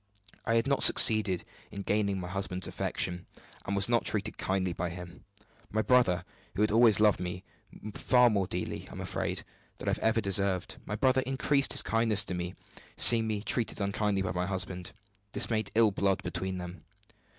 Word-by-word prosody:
I 115 - +1
had 115 - +1
not 140 0 0
succeeded 105 -5 +6 0.3
in 100 - -8
gaining 100 -2 -1
my 90 - -6
husband's 95 -1 -4
affection, 90 -1 -2 0.4
and 100 - -2
was 100 -1 +2
not 120 -1 +1
treated 105 0 -2
kindly 95 -2 -2
by 85 +1 -4
him. 90 0 -11 0.4
My 110 +1 -1
brother 95 -9 +2 0.3
who 105 - +1
has 105 - +1
always 110 -2 +5
loved 105 -2 +3
me 90 +1 -6 0.5
far 125 +1 +3
more 100 -3 -1
dearly, 90 -1 -5
I - - -12
am - - -9
afraid, - - -3 0.3
than - - -9
I - - +2
have - - -2
ever 110 0 +1
deserved 100 -2 0
my 105 - -5
brother 130 +3 +1
increased 140 +1 +2
his - - +5
kindness 115 -2 +1
to 95 - -5
me, 90 0 -5 0.4
seeing 115 -2 +6
me 105 -2 -3
treated 115 -1 -1
unkindly 100 0 -1
by 90 - -3
my 90 0 -3
husband. 90 -2 -4 0.4
This - - +1
made 110 -3 -1
ill 110 -2 +4
blood 95 0 -1
between 90 +2 -4
them. 90 0 -9
100 Hz, 185 wpm, -29 LUFS, 90-110 Hz, 0.5 s, succeeded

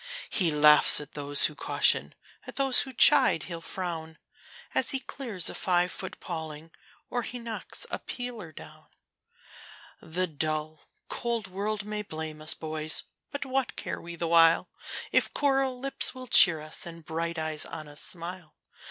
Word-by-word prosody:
He 180 -5 +3
laughs 150 0 +6
at 150 -1 -9
those 145 -1 +5
who 155 - -1
caution, - - +2 0.3
at - - -9
those 270 -2 +3
who 265 - -2
chide 260 - +6
he'll 170 -2 -7
frown, 165 -2 -5 0.6
As - - +2
he 270 - 0
clears 235 -9 -3
a - - 0
five 180 -1 +1
foot 190 - -7
paling, 160 -2 -7 0.4
or 245 - -1
he 245 - -7
knocks 230 -2 -5
a - - -3
peeler 240 -9 -7
down. - - -14 1.1
The 175 +3 -2
dull, 155 -1 -4 0.3
cold 235 -2 -3
world 205 +2 -4
may 210 0 -4
blame 155 -5 -7
us, 155 - +1
boys! 155 0 -1 0.3
but 285 -1 -5
what 265 -1 -2
care - - -6
we 170 0 -9
the 170 - -4
while, 165 0 +4 0.4
If - - +2
coral 270 -2 +1
lips 275 0 -2
will 255 0 -9
cheer 175 -8 +6
us, 155 +2 -3
and 165 -1 -11
bright 170 +1 -4
eyes 155 -1 0
on 155 -1 -7
us 145 0 -4
smile? 170 -2 -5
170 Hz, 160 wpm, -27 LUFS, 155-230 Hz, 1.1 s, laughs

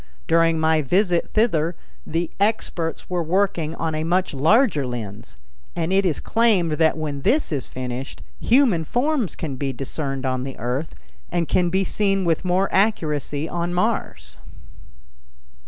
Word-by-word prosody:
During 165 0 +3
my 160 0 +3
visit 175 +4 +1
thither 175 -7 +2 0.3
the 165 +1 -2
experts 200 -6 -1
were 180 -1 -1
working 170 -2 0
on 165 -1 -2
a 155 0 -2
much 180 +2 0
larger 155 - +3
lens, 115 - -7 0.4
and 170 +1 -1
it 195 0 +3
is 160 - -1
claimed 215 -8 +2
that 160 -1 +3
when 145 -3 -4
this 290 - +1
is 140 -5 -2
finished 130 +1 -6 0.2
human 235 -9 +3
forms 250 - 0
can 140 -5 -5
be 135 0 -2
discerned 135 +1 -4
on 130 -1 -1
the 135 0 -6
Earth 125 +6 -3 0.4
and 170 -2 0
can 175 -1 +2
be 190 +2 +1
seen 195 0 0
with 165 0 +1
more 185 +2 +2
accuracy 155 -7 0
on 175 +1 -2
Mars. 180 - -2
165 Hz, 150 wpm, -22 LUFS, 145-190 Hz, 0.4 s, During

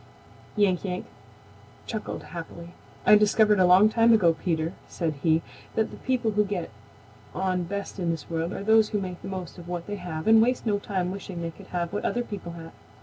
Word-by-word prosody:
Yank 200 -4 +2
Yank 180 -2 -3 0.8
chuckled 220 -2 -5
happily. 170 0 -9 0.3
"I - - +7
discovered 210 0 +4
a 185 - +5
long 185 +4 +7
time 230 +1 +4
ago, 175 -7 +5
Peter," 165 0 -2
said 165 -3 -2
he, 160 -1 +3 0.3
"that 220 0 +1
the - - -9
people 250 -4 0
who 210 0 +3
get 195 - -4 0.6
on 185 -1 0
best 200 +2 -5
in 175 -2 -1
this 165 -3 -3
world 165 +1 -2
are 200 - -5
those 220 0 +5
who 210 - -1
make 180 -2 -6
the - - -7
most 185 -2 -6
of 170 - -11
what 175 -1 -4
they 205 0 -4
have 160 -4 -5
and 220 0 +7
waste 245 +2 +1
no 205 -2 +1
time 185 -3 -2
wishing 185 -3 -6
they 165 - -3
could 190 +3 -15
have 170 -1 -3
what 205 - -2
other 245 - 0
people 195 -7 -7
have. 165 -1 -9
185 Hz, 205 wpm, -26 LUFS, 170-210 Hz, 0.8 s, I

